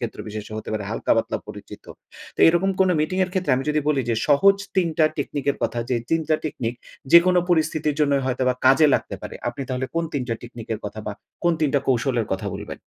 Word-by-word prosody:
ক্ষেত্র 120 Hz, -2 st, -5 dB
বিশেষে 105 Hz, 0 st, -7 dB
হতে 110 Hz, -, -7 dB
পারে, 105 Hz, -1 st, -2 dB
হালকা-পাতলা 115 Hz, -, 0 dB
পরিচিত। -, -, -10 dB, 0.5 s
তো -, -, -4 dB
এরকম 175 Hz, +4 st, +2 dB
কোন 190 Hz, -, +5 dB
মিটিং 185 Hz, +5 st, -1 dB
এর 185 Hz, -, -8 dB
ক্ষেত্রে 180 Hz, -8 st, +1 dB
আমি 135 Hz, -, -2 dB
যদি 150 Hz, 0 st, +1 dB
বলি 145 Hz, -3 st, +2 dB
যে -, -, +2 dB
সহজ 195 Hz, +8 st, +5 dB, 0.2 s
৩ 180 Hz, -3 st, +3 dB
টা 155 Hz, -, +6 dB
টেকনিক 145 Hz, -1 st, -3 dB
এর -, -, -4 dB
কথা 120 Hz, -, -1 dB
যে 125 Hz, -, +2 dB
৩ 165 Hz, -, +2 dB
টা 155 Hz, -, +4 dB
টেকনিক, 120 Hz, -6 st, -3 dB, 0.4 s
যেকোনো 180 Hz, +1 st, +7 dB
পরিস্থিতির 155 Hz, -2 st, +1 dB
জন্যই 140 Hz, -2 st, +2 dB
হয়তোবা 130 Hz, 0 st, +1 dB
কাজে 135 Hz, +4 st, +6 dB
লাগতে -, -, -2 dB
পারে, -, -, -7 dB
আপনি 120 Hz, +3 st, -5 dB
তাহলে 130 Hz, +1 st, -2 dB
কোন 165 Hz, -, +1 dB
৩ 140 Hz, -, -1 dB
টা 115 Hz, -, 0 dB
টেকনিক 120 Hz, -2 st, -9 dB
এর 110 Hz, -, -8 dB
কথা 110 Hz, -, -6 dB
বা, 105 Hz, -, -2 dB, 0.3 s
কোন 170 Hz, -, +4 dB
৩ 155 Hz, -, +3 dB
টা 140 Hz, -, +4 dB
কৌশলের 120 Hz, -2 st, +1 dB
কথা 95 Hz, -, -3 dB
বলবেন? -, -, -7 dB
140 Hz, 225 wpm, -23 LUFS, 120-165 Hz, 0.5 s, যেকোনো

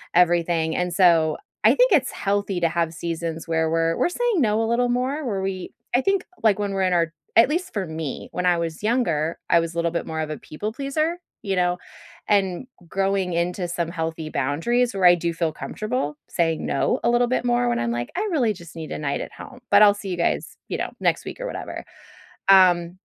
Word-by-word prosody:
everything 170 Hz, -2 st, +3 dB
and 180 Hz, -1 st, -1 dB
so 165 Hz, -4 st, +4 dB, 0.3 s
I -, -, +7 dB
think -, -, +4 dB
it's -, -, +3 dB
healthy 200 Hz, -2 st, -1 dB
to 170 Hz, -, +3 dB
have 165 Hz, 0 st, -1 dB
seasons 165 Hz, -1 st, -4 dB
where 160 Hz, -1 st, +1 dB
we're 165 Hz, 0 st, +1 dB
we're -, -, +2 dB
saying 465 Hz, -2 st, 0 dB
no 215 Hz, -2 st, +2 dB
a -, -, +1 dB
little 245 Hz, +1 st, +2 dB
more, 260 Hz, +5 st, -1 dB
where 200 Hz, -6 st, -2 dB
we 190 Hz, -1 st, -4 dB, 0.2 s
I 250 Hz, -, +4 dB
think, 390 Hz, +4 st, +1 dB, 0.2 s
like, 210 Hz, -2 st, +4 dB
when 200 Hz, -1 st, -1 dB
we're 195 Hz, 0 st, 0 dB
in 185 Hz, -1 st, +2 dB
our 165 Hz, -1 st, +1 dB, 0.2 s
at 235 Hz, +4 st, +7 dB
least 345 Hz, +4 st, -2 dB
for 200 Hz, -3 st, -2 dB
me, 160 Hz, -3 st, -5 dB
when 180 Hz, -, -2 dB
I 175 Hz, -1 st, +4 dB
was 165 Hz, +1 st, -4 dB
younger, 170 Hz, -9 st, 0 dB
I 170 Hz, -, +5 dB
was 165 Hz, 0 st, -3 dB
a -, -, -5 dB
little 170 Hz, 0 st, +1 dB
bit 170 Hz, -, -2 dB
more 160 Hz, -1 st, -4 dB
of 155 Hz, -, -3 dB
a -, -, -4 dB
people 205 Hz, +8 st, -6 dB
pleaser, 310 Hz, +6 st, -1 dB, 0.3 s
you 195 Hz, -2 st, -1 dB
know? 180 Hz, 0 st, +2 dB, 0.5 s
And 195 Hz, +1 st, +1 dB, 0.2 s
growing 195 Hz, 0 st, 0 dB
into 175 Hz, +2 st, -1 dB
some 170 Hz, -1 st, -2 dB
healthy 160 Hz, -2 st, -4 dB
boundaries 185 Hz, -, 0 dB
where 190 Hz, -2 st, +1 dB
I 175 Hz, -, +9 dB
do 170 Hz, 0 st, -2 dB
feel 165 Hz, -1 st, -1 dB
comfortable 215 Hz, -, -3 dB
saying 165 Hz, -2 st, 0 dB
"No" 140 Hz, -, 0 dB
a -, -, +3 dB
little 240 Hz, 0 st, +3 dB
bit 250 Hz, 0 st, -1 dB
more 240 Hz, 0 st, +2 dB
when -, -, 0 dB
I'm 120 Hz, 0 st, -1 dB
like, 120 Hz, 0 st, -3 dB
"I 415 Hz, +4 st, -1 dB
really 250 Hz, -9 st, +2 dB
just 170 Hz, -4 st, -13 dB
need 160 Hz, -2 st, -7 dB
a -, -, -3 dB
night 140 Hz, -2 st, -2 dB
at -, -, -7 dB
home, 260 Hz, -3 st, -11 dB
but 205 Hz, +1 st, +7 dB
I'll 205 Hz, -1 st, +7 dB
see 205 Hz, -1 st, -7 dB
you 180 Hz, -, -3 dB
guys, 170 Hz, -, -1 dB
you -, -, -2 dB
know, -, -, -2 dB
next -, -, +1 dB
week -, -, -7 dB
or -, -, -3 dB
whatever." -, -, -6 dB, 0.6 s
Um, 180 Hz, -2 st, +5 dB
180 Hz, 225 wpm, -23 LUFS, 165-225 Hz, 0.6 s, I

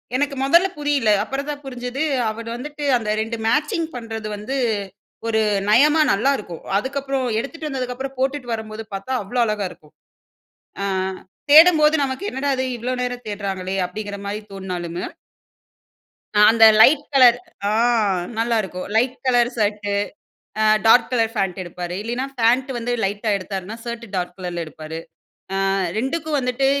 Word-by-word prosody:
எனக்கு 280 Hz, +1 st, 0 dB
மொதல்ல 340 Hz, +7 st, +5 dB
புரியல. 290 Hz, -6 st, +1 dB
அப்புறம் 275 Hz, +4 st, -4 dB
தான் 290 Hz, -1 st, -5 dB
புரிஞ்சது, 250 Hz, +1 st, -5 dB, 0.3 s
அவரு 230 Hz, +1 st, -6 dB
வந்துட்டு 295 Hz, +4 st, -7 dB
அந்த 220 Hz, -2 st, -4 dB
2 225 Hz, +1 st, -3 dB
மேட்சிங் 300 Hz, +5 st, +1 dB
பண்றது 225 Hz, -2 st, -5 dB
வந்து, 220 Hz, +7 st, -4 dB, 0.7 s
ஒரு 220 Hz, -1 st, +2 dB, 0.3 s
நயமா 295 Hz, +8 st, +5 dB
நல்லாருக்கும். 210 Hz, -6 st, -1 dB, 0.2 s
அதுக்கப்புறம் 270 Hz, +3 st, -2 dB
எடுத்துட்டு 305 Hz, +5 st, -5 dB
வந்ததுக்கு 255 Hz, -2 st, -3 dB
அப்புறம் 270 Hz, +1 st, -6 dB
போட்டுட்டு 265 Hz, -1 st, -1 dB
வரும்போது 220 Hz, 0 st, -5 dB
பாத்தா 195 Hz, +6 st, -5 dB
அவ்ளோ 245 Hz, +6 st, -3 dB
அழகாருக்கும். 200 Hz, -8 st, -4 dB, 0.9 s
ஆ -, -, -1 dB, 0.7 s
தேடும்போது 315 Hz, 0 st, +7 dB
நமக்கு 265 Hz, +8 st, -4 dB
என்னடா 275 Hz, +2 st, -2 dB
இது 260 Hz, -, -1 dB
இவ்ளோ 245 Hz, +2 st, -3 dB
நேரம் 245 Hz, 0 st, -4 dB
தேடுறாங்களே, 195 Hz, -2 st, -3 dB
அப்டிங்கிற 205 Hz, +2 st, -6 dB
மாரி 205 Hz, +1 st, -3 dB
தோண்ணாலுமு 180 Hz, -3 st, -5 dB, 1.3 s
அ -, -, +6 dB
அந்த 225 Hz, 0 st, +6 dB, 0.2 s
லைட் 290 Hz, +4 st, +6 dB
கலர் 250 Hz, -3 st, +7 dB, 0.3 s
ஆ -, -, +1 dB, 0.7 s
நல்லா 230 Hz, +1 st, +1 dB
இருக்கும். 185 Hz, -2 st, -6 dB
லைட் 245 Hz, +3 st, +2 dB
கலர் 245 Hz, -2 st, +3 dB
ஷர்ட் 210 Hz, -1 st, 0 dB, 0.8 s
அ -, -, +4 dB, 0.2 s
டார்க் 235 Hz, +1 st, +6 dB
கலர் 225 Hz, -2 st, +1 dB
ஃபாண்ட் 195 Hz, -3 st, -1 dB
எடுப்பாரு. 175 Hz, 0 st, -6 dB
இல்லயின்னா, 240 Hz, +4 st, -3 dB
ஃபாண்ட் 250 Hz, +3 st, +2 dB
வந்து 240 Hz, +1 st, -2 dB
லைட்டா 205 Hz, +2 st, -1 dB
எடுத்தாருன்னா, 195 Hz, +2 st, -5 dB
ஷர்ட் 235 Hz, 0 st, -5 dB
டார்க் 180 Hz, -1 st, -3 dB
கலர்ல 175 Hz, -2 st, -4 dB
எடுப்பாரு. 155 Hz, 0 st, -8 dB, 0.6 s
அ 195 Hz, -, 0 dB, 0.4 s
2 265 Hz, +8 st, 0 dB
க்கும் 310 Hz, -2 st, -1 dB
வந்துட்டு 250 Hz, +1 st, 0 dB
235 Hz, 145 wpm, -21 LUFS, 205-270 Hz, 1.3 s, தேடும்போது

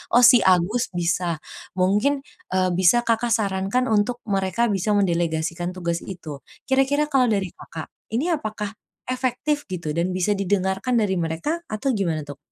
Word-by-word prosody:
oh 245 Hz, -, +7 dB
si 245 Hz, 0 st, +9 dB
Agus 190 Hz, +5 st, +3 dB
bisa," 175 Hz, -1 st, -1 dB, 0.3 s
mungkin, 210 Hz, +10 st, +2 dB, 0.3 s
eee, 185 Hz, -1 st, +2 dB
bisa 185 Hz, +7 st, +4 dB
Kakak 230 Hz, 0 st, +2 dB
sarankan 200 Hz, +4 st, 0 dB
untuk 220 Hz, +3 st, +1 dB
mereka 200 Hz, +2 st, 0 dB
bisa 205 Hz, +2 st, +1 dB
mendelegasikan 170 Hz, -1 st, 0 dB
tugas 170 Hz, -2 st, -2 dB
itu. 165 Hz, -7 st, -7 dB, 0.2 s
Kira-kira 280 Hz, +3 st, +1 dB
kalau 260 Hz, -2 st, +4 dB
dari 195 Hz, -5 st, 0 dB
Kakak, 160 Hz, -1 st, -9 dB, 0.2 s
ini 310 Hz, +9 st, +1 dB
apakah 215 Hz, -8 st, -3 dB, 0.4 s
efektif 260 Hz, +4 st, -1 dB
gitu 175 Hz, -5 st, -4 dB
dan 170 Hz, +4 st, -1 dB
bisa 185 Hz, +3 st, +1 dB
didengarkan 195 Hz, +3 st, 0 dB
dari 195 Hz, -5 st, +1 dB
mereka 165 Hz, -, -2 dB
atau 215 Hz, +5 st, -1 dB
gimana 170 Hz, -, -1 dB
tuh? 145 Hz, -1 st, -9 dB
195 Hz, 150 wpm, -23 LUFS, 175-240 Hz, 0.4 s, si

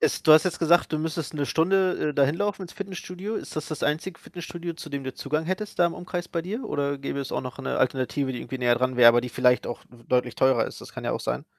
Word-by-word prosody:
Es -, -, +1 dB
du 155 Hz, -, +7 dB
hast 155 Hz, -, +7 dB
jetzt 185 Hz, -, -1 dB
gesagt, 170 Hz, 0 st, +3 dB
du 155 Hz, -, +1 dB
müsstest 160 Hz, -1 st, -3 dB
1 145 Hz, -2 st, -2 dB
Stunde, 185 Hz, -1 st, +2 dB
äh, -, -, -7 dB
dahin 140 Hz, +2 st, +3 dB
laufen 205 Hz, 0 st, -1 dB
ins 175 Hz, -, -8 dB
Fitnessstudio. 195 Hz, +1 st, -6 dB
Ist -, -, -7 dB
das 155 Hz, -, -3 dB
das 155 Hz, -, -5 dB
einzige 160 Hz, +4 st, -1 dB
Fitnessstudio, 175 Hz, -1 st, -7 dB
zu 155 Hz, -2 st, -9 dB
dem 140 Hz, -1 st, -4 dB
du 130 Hz, -1 st, -5 dB
Zugang 155 Hz, +3 st, -2 dB
hättest 200 Hz, +3 st, -3 dB
da 175 Hz, -, +6 dB
im 170 Hz, -, -3 dB
Umkreis 175 Hz, -1 st, -5 dB
bei 165 Hz, -2 st, -2 dB
dir? 220 Hz, +8 st, -4 dB
Oder 140 Hz, -1 st, -1 dB
gäbe 140 Hz, 0 st, -4 dB
es 135 Hz, -, -5 dB
auch -, -, 0 dB
noch 125 Hz, -1 st, -7 dB
'ne -, -, -2 dB
Alternative, 130 Hz, +1 st, 0 dB
die 125 Hz, -, -5 dB
irgendwie 130 Hz, +2 st, -6 dB
näher 120 Hz, -1 st, +3 dB
dran 130 Hz, +1 st, 0 dB
wär, 120 Hz, -1 st, +9 dB
aber 120 Hz, +1 st, +6 dB
die 125 Hz, -, -4 dB
vielleicht 125 Hz, 0 st, +3 dB
auch 120 Hz, -, -5 dB
w 120 Hz, -1 st, -18 dB
deutlich 125 Hz, -1 st, +1 dB
teurer 130 Hz, 0 st, +3 dB
ist? -, -, -9 dB
Das -, -, -11 dB
kann -, -, -7 dB
ja -, -, 0 dB
auch -, -, -2 dB
sein. -, -, -3 dB
155 Hz, 280 wpm, -26 LUFS, 130-175 Hz, -, wär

